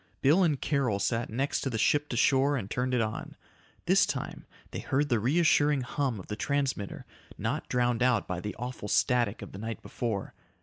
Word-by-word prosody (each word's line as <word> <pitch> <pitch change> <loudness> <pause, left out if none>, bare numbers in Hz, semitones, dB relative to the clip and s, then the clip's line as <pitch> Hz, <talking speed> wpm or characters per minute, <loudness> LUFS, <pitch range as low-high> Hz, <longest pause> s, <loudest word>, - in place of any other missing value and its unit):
Bill 150 +8 +5
and 150 -6 +2
Carol 135 -9 +1
sat 115 +3 -1
next 135 +6 -1
to 135 - -1
the 115 - -2
ship 145 +6 +2
to 120 - -2
shore 135 +3 +3
and 105 -4 -5
turned 125 0 0
it 120 - +2
on. 110 -1 -4 0.5
This - - +4
time - - -5 0.2
they - - -4
heard 145 +2 0
the 120 -4 +2
reassuring 145 +2 +3
hum 125 -2 -2
of 95 - -9
the 105 - -5
transmitter, 135 -5 -2 0.3
not - - -3
drowned 120 -1 +1
out 125 -4 +2
by 90 -1 -3
the 105 +1 -5
awful 125 -2 -6
static 120 -1 +1
of 100 - -9
the 95 - -9
night 115 +1 -5
before. 110 -5 -3
125 Hz, 200 wpm, -29 LUFS, 110-140 Hz, 0.5 s, Bill